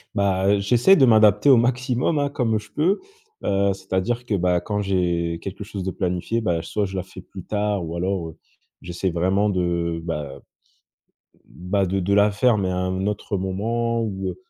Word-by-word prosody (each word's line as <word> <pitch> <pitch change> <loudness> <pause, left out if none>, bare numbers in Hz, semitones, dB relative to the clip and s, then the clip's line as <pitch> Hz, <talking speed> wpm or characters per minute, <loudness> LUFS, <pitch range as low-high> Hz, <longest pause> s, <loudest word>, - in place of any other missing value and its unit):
Bah, 95 -1 +1
heu, 100 0 +3
j'essaie 120 - +4
de 135 -8 +5
m'adapter 110 +2 +5
au 130 - +8
maximum 125 +4 +1
hein 145 0 0
comme 120 -5 0
je 105 - -15
peux, 180 +7 +1 0.4
heu, 100 0 +1
c'est-à-dire 95 +6 -2
que 115 - -3
bah 90 -1 +1
quand 105 +2 -2
j'ai 85 -3 -1
quelque 100 +3 -6
chose 100 -2 -6
de 95 - -2
planifié, 90 +6 -2
bah, 85 -6 0
soit 105 +4 -2
je 95 0 -7
la 95 - -2
fais 95 -1 -12
plus 95 -1 -11
tard 105 -3 -1
ou 80 +1 -6
alors, 90 -1 -2
heu, 80 - -13 0.4
j'essaie 90 +2 -3
vraiment 95 +5 +1
de, 85 -3 -1
bah, 75 -5 -4
heu, - - -17 1.0
bah 95 +3 -2
de 95 +1 -1
de 95 +2 0
la 105 +1 +4
faire, 110 +2 +2
mais 95 -2 -1
à 90 - -2
un 95 +1 -2
autre 105 -1 -3
moment 115 +5 -1
ou, 95 -4 -3
heu, 90 - -6
100 Hz, 200 wpm, -22 LUFS, 90-110 Hz, 1.0 s, au